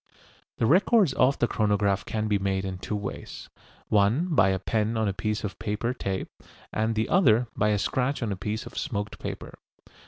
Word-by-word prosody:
The - - +1
records 185 - +4
of 130 +2 +3
the 120 - +2
chronograph 100 -3 +1
can 110 0 -2
be 105 -1 +1
made 95 -1 -1
in 95 -1 -5
two 105 - -4
ways: 100 -1 -7 0.4
one 110 - +3
by 110 -9 +5
a 95 - +1
pen 110 +3 -1
on 110 -1 +1
a 100 - 0
piece 105 +2 -2
of 105 - -5
paper 105 +4 -2
tape, 95 -5 -3 0.5
and 110 +1 0
the 110 +1 0
other 120 - +4
by 105 - +2
a 105 - +2
scratch 130 +6 -1
on 110 - -1
a - - -1
piece 105 +4 -4
of - - -11
smoked 105 -7 -3
paper. - - -7
105 Hz, 195 wpm, -26 LUFS, 100-120 Hz, 0.5 s, by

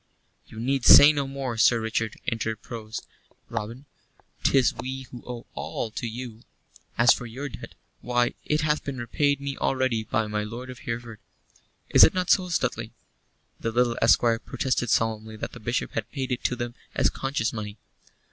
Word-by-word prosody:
"You 110 - -10
need 135 +2 0
say 145 +5 +10
no 140 -2 -1
more, 135 -3 -4
Sir 115 +2 +5
Richard," 110 -1 -2
interposed 110 0 -4 0.4
Robin. 115 +6 -5 0.6
"'Tis 135 -3 +4
we 130 +1 -5
who 120 - -9
owe 120 -1 -6
all 110 - -4
to 120 - -4
you. 115 -1 -7 0.6
As 120 +1 +7
for 125 - -6
your 135 +5 -6
debt, 125 - -10 0.3
why, 120 0 +1
it 150 +1 0
hath 150 0 +1
been 140 -2 -5
repaid 140 +4 0
me 140 0 -4
already 130 -4 0
by 110 0 0
my 105 0 -2
lord 120 +4 -7
of 125 - -11
Hereford. 115 -2 -5 0.7
Is - - +8
it 160 - +6
not 185 -1 +1
so, 185 -2 +3
Stuteley?" 170 - -1 0.7
The 115 - -2
little 120 0 +2
esquire 115 0 +4
protested 125 -1 -1
solemnly 110 0 0
that 110 - -5
the 120 - -10
Bishop 120 +3 -2
had 110 -2 -4
paid 135 -2 -3
it 125 - -2
to 125 - +1
them 120 0 -4 0.2
as - - +3
conscience 135 -4 -2
money. 105 -1 -6
120 Hz, 175 wpm, -26 LUFS, 115-135 Hz, 0.7 s, say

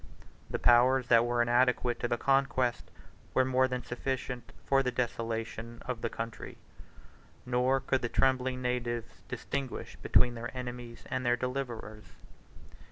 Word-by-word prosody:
The - - -1
powers 125 +1 +4
that 115 0 +6
were 120 0 +2
inadequate 125 0 +2
to 120 - 0
the 120 - 0
conquest, 135 -2 +1 0.5
were 130 - +5
more 130 0 +3
than 125 -1 -3
sufficient 125 0 -4
for 135 0 +4
the 130 - 0
desolation, 115 -1 -3
of 125 -3 -3
the 115 - -1
country; 115 0 -6 0.9
nor 125 +2 +2
could 135 0 0
the 120 - -1
trembling 130 0 +1
natives 120 -1 -2
distinguish 135 -3 -4
between 120 - +3
their 115 0 -5
enemies 120 -1 -6
and 130 -1 -1
their 120 0 +3
deliverers. 120 -4 -4
125 Hz, 140 wpm, -31 LUFS, 120-130 Hz, 0.9 s, that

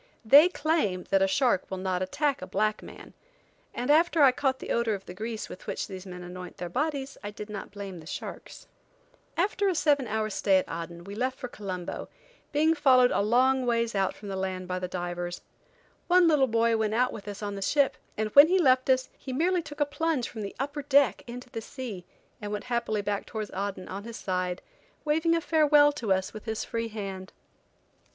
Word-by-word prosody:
They 290 +9 +8
claim 305 - 0
that 195 -1 +4
a 195 - +4
shark 235 0 +1
will 190 - -4
not 185 -1 -1
attack 280 +9 0
a 185 - -6
black 215 +2 0
man, - - -12 0.6
and 250 +4 -1
after 325 0 +4
I 265 -2 +7
had - - -25
caught 270 -2 +1
the - - -6
odor 230 -2 +1
of 195 - -10
the - - -8
grease 220 +3 -5
with 185 - -11
which - - -2
these 190 -1 -9
men 180 -1 -8
annoint 180 0 -9
their 175 0 -5
bodies, 280 - -2
I 205 - -4
did 210 +1 -8
not 205 - -6
blame 200 -3 -7
the 155 - -13
sharks. 190 - -8 0.7
After 395 +3 +1
a 370 - 0
seven 290 -5 +2
hours 215 0 -1
stay 195 -1 +3
at 185 - 0
Aden 170 +1 -6
we 200 +3 -8
left 255 +4 -2
for 250 - -5
Colombo, 185 -6 -6 0.4
being 310 +2 +3
followed 260 -5 +5
a - - +2
long 255 +4 +3
ways 235 -1 +1
out 195 -2 0
from 205 - -9
land 190 -1 -3
by 185 0 -2
the 180 - -3
divers. 175 -1 -4 0.7
One 360 -1 +5
little 295 -5 +4
boy 230 0 +2
went 220 0 0
out 250 +2 +2
with 205 -1 -9
us 205 +1 -6
on 205 -1 -3
the 200 - -6
ship, 280 +7 +2 0.2
and 215 0 -1
when 285 +7 +9
he 370 +3 +3
left 260 -6 +3
us 260 0 +3
he 265 - -8
merely 345 +7 +1
took 295 -2 -10
a - - +5
plunge 295 -3 -1
from 220 - -7
the 200 - -6
upper 290 +2 -3
deck 280 -1 +3
into 245 +1 -9
the 225 -3 -5
sea 220 -7 -7 0.4
and 205 0 -5
went 210 -1 -3
happily 220 -3 0
back 205 0 -2
towards 215 -3 -5
Aden, 195 -1 -4
on 200 +2 -6
his 230 -1 -7
side, 180 -1 -2 0.4
waving 320 +2 +2
a 335 - 0
farewell 300 -2 +5
to 245 -8 -4
us 190 0 +1
with 215 0 -9
his 220 -1 -3
free 230 0 -3
hand. 195 -3 -6
225 Hz, 215 wpm, -28 LUFS, 195-280 Hz, 0.7 s, when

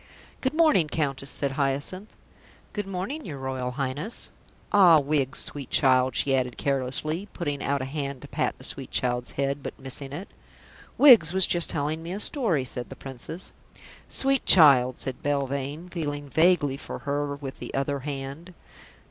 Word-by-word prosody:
"Good 265 +3 -1
morning, 310 - +4
Countess," 140 -3 -2
said 140 0 -1
Hyacinth. 145 +8 -3 0.6
"Good 205 -2 -3
morning, 195 +12 -4
your 155 - -7
Royal 130 -1 -3
Highness. 140 - -3 0.4
Ah, 180 -6 +7
Wiggs, 140 -2 -1
sweet 140 -3 -3
child," 130 -2 +3
she 135 -1 +2
added 125 -2 -1
carelessly, 140 +7 -1
putting 145 -5 -3
out 140 -1 -1
a - - -3
hand 140 -1 -5
to - - -9
pat - - -2
the - - -14
sweet - - -4
child's 125 -1 -1
head, 140 +1 -1
but - - -7
missing 135 +1 -7
it. 175 +9 -6 0.7
"Wiggs 230 - +7
was 190 -1 +5
just 175 -1 +3
telling 155 +1 -1
me 170 +2 -6
a 200 - -4
story," 205 - +2
said 125 -1 -6
the 135 - -8
Princess. 135 +7 -8 0.6
"Sweet 270 -1 +1
child," 135 -7 +6
said 130 -1 -5
Belvane, 140 +3 -2
feeling 145 -4 -4
vaguely 160 -3 +3
for - - -7
her 145 0 -1
with 140 -2 -8
the - - -7
other 140 +1 -1
hand. 140 +5 -7
145 Hz, 165 wpm, -26 LUFS, 135-170 Hz, 0.7 s, Ah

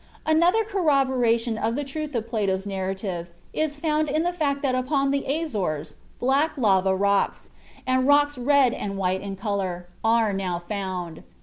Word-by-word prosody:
Another 340 +8 +4
corroboration 260 - +1
of 225 +1 0
the 290 - -1
truth 295 +1 -5
of 225 -1 -2
Plato's 200 -4 -1
narrative 190 -2 -3 0.2
is 305 -2 -1
found 305 0 0
in 310 +3 +1
the 350 +1 0
fact 285 -4 -1
that 265 -2 +1
upon 275 +2 +1
the 280 0 0
Azores 195 - -2 0.3
black 275 +5 +2
lava 190 -5 +3
rocks, 200 +1 0 0.3
and 255 0 +2
rocks 290 0 +4
red 265 0 +3
and 200 -1 -4
white 190 0 0
in 200 -1 -5
color, 190 -3 -3 0.2
are 225 -2 +3
now 185 -3 -2
found. 180 -3 -5
235 Hz, 160 wpm, -25 LUFS, 195-290 Hz, 0.3 s, Another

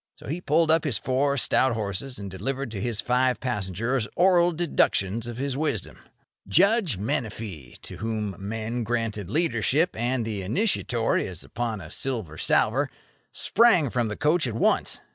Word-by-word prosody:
So - - -15
he 165 +6 -3
pulled 160 0 +3
up 160 0 +3
his 135 -9 0
four 135 +5 +1
stout 130 0 +2
horses, 110 +4 -4
and 100 -2 -6
delivered 130 +7 -3
to 100 -3 -5
his 115 -1 -1
five 125 0 +1
passengers 115 +1 -1
oral 175 -1 +4
deductions 115 - +1
of 120 -1 -6
his 135 0 -2
wisdom. 145 -8 -2 0.5
Judge 195 - +3
Menefee, 105 - -4
to - - -8
whom 110 -3 -3
men 115 +4 -3
granted 110 -4 -2
leadership 145 - +1
and 120 +1 -1
the 105 -3 -3
initiatory 120 - 0
as 90 -3 -7
upon 115 -3 -3
a 80 -1 -10
silver 110 - -3
salver, - - +2 0.4
sprang 190 - +3
from 120 -2 0
the 105 - -5
coach 150 +1 +2
at 115 - -4
once. 115 - +1
120 Hz, 160 wpm, -26 LUFS, 105-140 Hz, 0.5 s, oral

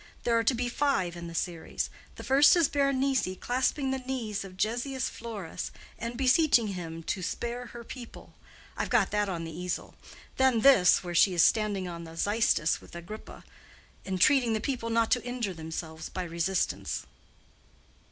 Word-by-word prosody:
There 235 - +2
are 230 - +3
to 255 - +3
be 245 +1 -1
five 240 -10 0
in 170 0 -7
the 170 - -8
series. 170 -1 -3 0.2
The - - -9
first 275 +6 +6
is 335 -4 +4
Berenice 275 -3 +1
clasping 265 +2 0
the 265 - -1
knees 245 -6 -3
of 185 -1 -11
Gessius 245 +6 -1
Florus 215 -7 -6 0.3
and 235 +1 -4
beseeching 255 -3 +4
him 165 -3 -6
to 190 - -2
spare 235 +6 -4
her 235 0 -9
people; 240 0 -10 0.4
I've - - -2
got 230 -6 +3
that 210 -1 +1
on 170 -3 -3
the 165 -1 -7
easel. 180 0 -4 0.4
Then, 260 -4 +3
this, 205 -11 +6
where 175 -1 -5
she 180 +2 +4
is 170 - +5
standing 205 -4 +2
on 170 -1 -7
the 165 0 -11
Xystus 205 -4 +2
with - - -14
Agrippa, 170 +6 -9 0.6
entreating 230 - +3
the 220 - 0
people 235 -1 -3
not 230 0 +2
to 245 - +3
injure 245 -5 -3
themselves 160 -1 -6
by 185 - -4
resistance." 170 - -1
220 Hz, 170 wpm, -29 LUFS, 180-250 Hz, 0.6 s, first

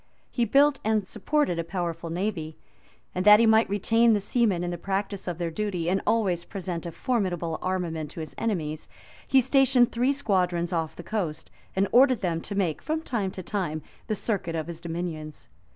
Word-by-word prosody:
He 240 - +1
built 275 +4 +4
an 215 -2 +1
supported 215 - 0
a - - 0
powerful 170 -1 -4
navy;[*] 170 -3 -3 0.6
and 180 - -1
that 210 +1 +8
he 230 - +5
might 220 0 +4
retain 225 +3 +3
the 210 - +2
seamen 205 -4 +1
in 175 - -2
the 175 - -4
practice 195 +1 -3
of 175 -2 -3
their 170 -1 -2
duty, 180 -2 -2
and 195 - +1
always 190 -7 +1
present 180 -4 -5
a - - -5
formidable 175 -8 -1
armament 170 -5 -2
to 165 - -9
his 155 -2 -6
enemies, 160 -9 -2 0.4
he 265 - +5
stationed 260 -1 +4
three 245 +3 +2
squadrons 180 -10 0
off 160 -2 -2
the 175 - -9
coast, 175 -7 -3 0.2
and 195 +1 +2
ordered 255 -1 +5
them 170 -4 -1
to 200 - -6
make, 175 -7 0
from 315 +1 -2
time 215 -9 -1
to 185 0 -8
time, 170 -6 -3 0.2
the 215 - 0
circuit 195 -6 -2
of 160 -1 -2
his 170 -1 -7
dominions. 165 -3 -5
190 Hz, 190 wpm, -26 LUFS, 170-220 Hz, 0.6 s, that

